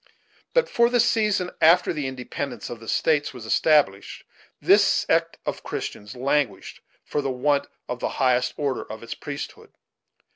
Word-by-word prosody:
But, -, -, +4 dB
for 235 Hz, -, +3 dB
the 245 Hz, 0 st, +2 dB
season, 210 Hz, -5 st, +2 dB
after 170 Hz, +3 st, +5 dB
the 150 Hz, -4 st, -3 dB
independence 125 Hz, -2 st, -5 dB
of 120 Hz, -, -7 dB
the 115 Hz, -, -13 dB
States 150 Hz, 0 st, +1 dB
was 120 Hz, -3 st, -9 dB
established, 110 Hz, -5 st, +2 dB, 0.4 s
this -, -, +5 dB
sect -, -, +1 dB
of -, -, -3 dB
Christians 105 Hz, +3 st, -6 dB
languished 130 Hz, -5 st, -1 dB, 0.2 s
for 145 Hz, -, -2 dB
the 135 Hz, -, -2 dB
want 140 Hz, +2 st, +1 dB, 0.2 s
of 125 Hz, -, -4 dB
the -, -, -1 dB
highest 125 Hz, -2 st, +2 dB
order 140 Hz, -3 st, -1 dB
of 110 Hz, +1 st, -8 dB
its 115 Hz, -, -5 dB
priesthood. 145 Hz, 0 st, -8 dB
140 Hz, 155 wpm, -24 LUFS, 125-155 Hz, 0.4 s, after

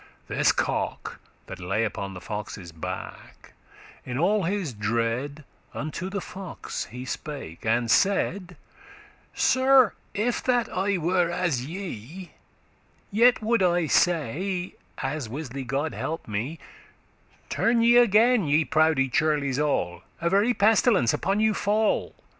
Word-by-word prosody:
This -, -, +3 dB
cock, -, -, -2 dB, 0.3 s
that 95 Hz, -, -9 dB
lay 95 Hz, +5 st, -1 dB
upon 100 Hz, -2 st, -5 dB
the 90 Hz, -, -8 dB
fox's 105 Hz, -4 st, -6 dB
back, 80 Hz, -1 st, -8 dB, 0.5 s
In 125 Hz, 0 st, -5 dB
all 195 Hz, +5 st, +2 dB
his 185 Hz, -6 st, -2 dB
dread 115 Hz, +7 st, -2 dB, 0.3 s
unto 155 Hz, +5 st, -4 dB
the 200 Hz, 0 st, -3 dB
fox 190 Hz, -1 st, -6 dB
he 125 Hz, +2 st, -8 dB
spake, 135 Hz, -, -6 dB
And 115 Hz, +1 st, +1 dB
saide, 190 Hz, -2 st, +1 dB, 0.8 s
"Sir, 260 Hz, -3 st, +4 dB, 0.2 s
if 230 Hz, +4 st, 0 dB
that 245 Hz, -2 st, +2 dB
I 195 Hz, +1 st, +1 dB
were 175 Hz, +1 st, +1 dB
as 170 Hz, -8 st, -1 dB
ye, 175 Hz, -, -7 dB, 0.8 s
Yet 235 Hz, +2 st, +4 dB
would 230 Hz, -1 st, +2 dB
I 175 Hz, -2 st, +2 dB
say 175 Hz, +4 st, 0 dB, 0.2 s
(as 135 Hz, -2 st, -3 dB
wisly* 135 Hz, 0 st, -5 dB
God 140 Hz, +5 st, -1 dB
help 160 Hz, +1 st, -4 dB
me), 115 Hz, +10 st, -3 dB
*surely 425 Hz, -, -24 dB, 0.2 s
'Turn 235 Hz, -, +3 dB
ye 235 Hz, +1 st, +6 dB
again, 230 Hz, -3 st, +4 dB
ye 150 Hz, +2 st, +3 dB
proude 155 Hz, -4 st, +2 dB
churles 145 Hz, -2 st, +1 dB
all; 90 Hz, -12 st, -1 dB, 0.2 s
A 170 Hz, 0 st, 0 dB
very 210 Hz, +5 st, +3 dB
pestilence 210 Hz, -, +4 dB
upon 195 Hz, +2 st, 0 dB
you 220 Hz, 0 st, +3 dB
fall. 210 Hz, +1 st, 0 dB
165 Hz, 130 wpm, -26 LUFS, 130-200 Hz, 0.8 s, ye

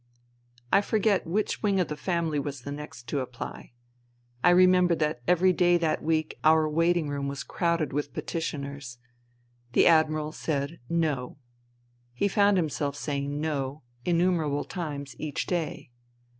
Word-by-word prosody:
I 195 Hz, -, +7 dB
forget 205 Hz, -3 st, +1 dB
which 205 Hz, +6 st, -1 dB
wing 200 Hz, -3 st, +2 dB
of 180 Hz, -, +1 dB
the 150 Hz, -, -4 dB
family 165 Hz, -2 st, -1 dB
was 140 Hz, -2 st, -5 dB
the 140 Hz, -, -6 dB
next 145 Hz, -4 st, -8 dB
to 145 Hz, -, 0 dB
apply. 125 Hz, -2 st, -7 dB, 0.7 s
I -, -, +7 dB
remember 180 Hz, -1 st, +5 dB
that 150 Hz, -6 st, -1 dB
every 180 Hz, +1 st, +4 dB
day 175 Hz, 0 st, +4 dB
that 160 Hz, -2 st, 0 dB
week 155 Hz, -1 st, -1 dB
our 155 Hz, 0 st, +5 dB
waiting 165 Hz, +1 st, +2 dB
room 140 Hz, -1 st, -3 dB
was 140 Hz, 0 st, -4 dB
crowded 170 Hz, -5 st, -1 dB
with 145 Hz, 0 st, -2 dB
petitioners. 140 Hz, -7 st, -5 dB, 0.8 s
The -, -, +5 dB
Admiral 155 Hz, -2 st, +3 dB
said 150 Hz, 0 st, -3 dB
No. 150 Hz, -8 st, -1 dB, 0.8 s
He 200 Hz, -, +1 dB
found 200 Hz, 0 st, +3 dB
himself 145 Hz, -4 st, -1 dB
saying 145 Hz, 0 st, -3 dB
No 145 Hz, -2 st, -3 dB, 0.2 s
innumerable 170 Hz, -4 st, +1 dB
times 145 Hz, -6 st, -5 dB
each 150 Hz, -2 st, -3 dB
day. 165 Hz, -7 st, -3 dB
155 Hz, 145 wpm, -27 LUFS, 145-175 Hz, 0.8 s, I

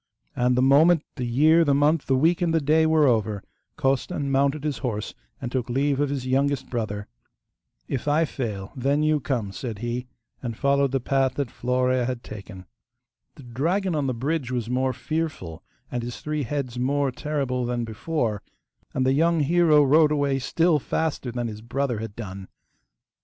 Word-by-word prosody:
And 125 Hz, 0 st, +2 dB
the 125 Hz, -, +3 dB
moment 155 Hz, +4 st, +5 dB
the 125 Hz, -4 st, -3 dB
year, 155 Hz, +7 st, +5 dB
the 140 Hz, -3 st, +2 dB
month, 145 Hz, +2 st, +2 dB
the 135 Hz, -, +3 dB
week, 165 Hz, +7 st, +2 dB
and 165 Hz, -2 st, +1 dB
the -, -, +4 dB
day 155 Hz, +2 st, +3 dB
were 160 Hz, -1 st, +4 dB
over 110 Hz, -5 st, +1 dB, 0.3 s
Costan 135 Hz, +1 st, -1 dB
mounted 140 Hz, +2 st, +1 dB
his 145 Hz, -6 st, -2 dB
horse 110 Hz, -4 st, -3 dB, 0.3 s
and 120 Hz, -2 st, -5 dB
took 125 Hz, -2 st, -2 dB
leave 140 Hz, +2 st, +1 dB
of 145 Hz, -1 st, +1 dB
his 135 Hz, -2 st, -3 dB
youngest 135 Hz, +1 st, 0 dB
brother. 105 Hz, -4 st, -3 dB, 0.8 s
'If 135 Hz, +1 st, -3 dB
I 155 Hz, +3 st, +3 dB
fail, 105 Hz, -9 st, -5 dB
then 140 Hz, +3 st, +1 dB
you 155 Hz, 0 st, +2 dB
come,' 125 Hz, -7 st, -2 dB
said 110 Hz, +3 st, -5 dB
he, 120 Hz, +3 st, -4 dB, 0.3 s
and 115 Hz, -3 st, -5 dB
followed 140 Hz, -1 st, +2 dB
the 135 Hz, -, +1 dB
path 135 Hz, +1 st, +1 dB
that 140 Hz, -5 st, -2 dB
Florea 125 Hz, 0 st, 0 dB
had 125 Hz, -2 st, -4 dB
taken. 100 Hz, -3 st, -9 dB, 0.7 s
The 145 Hz, -, -13 dB
dragon 170 Hz, -, -1 dB
on 145 Hz, -3 st, 0 dB
the 130 Hz, -, -1 dB
bridge 140 Hz, +2 st, -2 dB
was 120 Hz, -2 st, -2 dB
more 130 Hz, +1 st, +1 dB
fearful 130 Hz, -, -4 dB, 0.3 s
and 125 Hz, -, -2 dB
his 120 Hz, +1 st, -6 dB
three 150 Hz, 0 st, -2 dB
heads 125 Hz, -2 st, -3 dB
more 140 Hz, +2 st, +1 dB
terrible 130 Hz, -3 st, -2 dB
than 120 Hz, -1 st, -1 dB
before, 110 Hz, -1 st, -2 dB, 0.5 s
and 130 Hz, -, +1 dB
the 130 Hz, -, +3 dB
young 165 Hz, +2 st, +3 dB
hero 155 Hz, 0 st, +4 dB
rode 150 Hz, +2 st, +5 dB
away 140 Hz, -2 st, +1 dB
still 165 Hz, +5 st, +2 dB
faster 145 Hz, -3 st, -2 dB
than 120 Hz, 0 st, -3 dB
his 105 Hz, -1 st, -7 dB
brother 125 Hz, 0 st, -2 dB
had 110 Hz, -2 st, -6 dB
done. 95 Hz, -4 st, -7 dB
135 Hz, 180 wpm, -25 LUFS, 120-150 Hz, 0.8 s, moment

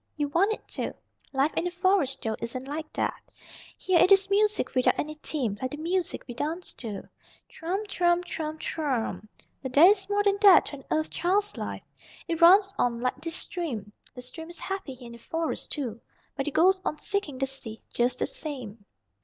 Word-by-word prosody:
You 290 Hz, -1 st, 0 dB
want 370 Hz, +8 st, +3 dB
it 440 Hz, -, -5 dB
to. -, -, -3 dB, 0.4 s
Life 275 Hz, +3 st, +1 dB
in -, -, 0 dB
the -, -, +1 dB
Forest, 355 Hz, -7 st, +1 dB
though, 220 Hz, -1 st, -1 dB
isn't 255 Hz, +3 st, -5 dB
like 305 Hz, +2 st, -5 dB
that. -, -, -1 dB, 0.6 s
Here 370 Hz, -2 st, +2 dB
it 370 Hz, -, +5 dB
is 390 Hz, 0 st, +5 dB
music 420 Hz, +1 st, +2 dB
without 255 Hz, -1 st, +3 dB
any 305 Hz, +1 st, -2 dB
theme, 235 Hz, -10 st, -2 dB
like 255 Hz, -, -1 dB
the 295 Hz, -, -6 dB
music 345 Hz, +3 st, -1 dB
we 245 Hz, -, -6 dB
dance 315 Hz, +8 st, -4 dB
to. 215 Hz, -5 st, -7 dB, 0.4 s
Thrum, 380 Hz, +6 st, -3 dB
thrum, 350 Hz, -3 st, +2 dB
thrum, 315 Hz, -3 st, -4 dB
thrummmmmmmm. 245 Hz, -, -2 dB, 0.3 s
But 260 Hz, -2 st, -5 dB
there 295 Hz, +5 st, +8 dB
is 390 Hz, +1 st, +4 dB
more 410 Hz, 0 st, +2 dB
than 400 Hz, 0 st, +2 dB
that 395 Hz, -3 st, +8 dB
to 285 Hz, -, -6 dB
an 270 Hz, -, -15 dB
Earth 310 Hz, 0 st, 0 dB
Child's 405 Hz, +4 st, +1 dB
life. -, -, -5 dB, 0.4 s
It 335 Hz, 0 st, -2 dB
runs 390 Hz, +3 st, +7 dB
on 235 Hz, -1 st, +1 dB
like 255 Hz, +3 st, -2 dB
this 330 Hz, +1 st, -4 dB
stream. 240 Hz, -, -4 dB, 0.2 s
The 250 Hz, -, -8 dB
stream 320 Hz, +6 st, -8 dB
is 345 Hz, -, -11 dB
happy 385 Hz, -9 st, -4 dB
here 250 Hz, -1 st, -13 dB
in 235 Hz, -, -9 dB
the 235 Hz, -, -11 dB
Forest, 325 Hz, +6 st, -3 dB
too, 240 Hz, -6 st, -3 dB, 0.3 s
but 275 Hz, 0 st, -2 dB
it 295 Hz, -, -3 dB
goes 375 Hz, +3 st, +5 dB
on 305 Hz, -, -2 dB
seeking 360 Hz, -7 st, -2 dB
the 270 Hz, -, +1 dB
sea 265 Hz, -5 st, -8 dB
just 245 Hz, +1 st, +1 dB
the -, -, +1 dB
same." 255 Hz, -, -6 dB
310 Hz, 205 wpm, -27 LUFS, 255-370 Hz, 0.6 s, there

